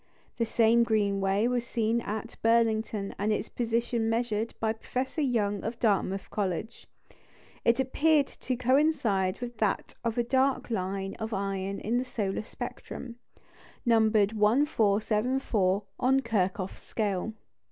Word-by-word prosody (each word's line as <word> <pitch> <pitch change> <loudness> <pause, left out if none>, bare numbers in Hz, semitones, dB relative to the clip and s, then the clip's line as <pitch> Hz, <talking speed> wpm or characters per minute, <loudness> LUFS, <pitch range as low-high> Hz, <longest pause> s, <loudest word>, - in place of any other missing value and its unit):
The 230 - +1
same 230 +1 +4
green 205 -4 +1
ray 195 +4 +2
was 245 -1 0
seen 230 0 0
at 220 +1 -5
Burlington 225 -3 +1
and 210 +2 +1
its 210 0 -1
position 230 -1 0
measured 225 -1 -1
by 220 0 +1
Professor 255 +7 -3
Young 210 -7 0
of 230 +2 -3
Dartmouth 195 -3 +1
College. 205 +2 -3 0.8
It 235 +2 +3
appeared 290 +3 +3
to 255 - -4
coincide 250 -7 +2
with 240 -2 -6
that 210 -3 0
of 230 0 -1
a 240 - +3
dark 260 +1 +1
line 195 -1 -2
of 220 0 -3
iron 195 0 -2
in 235 +3 0
the - - -1
solar 210 -6 -2
spectrum, 235 +2 -7 0.7
numbered 220 -3 +4
1,474 215 -3 +2 0.2
on 265 +2 +3
Kirchhoff's 195 -5 -1
scale. 210 -1 -2
225 Hz, 130 wpm, -29 LUFS, 200-240 Hz, 0.8 s, same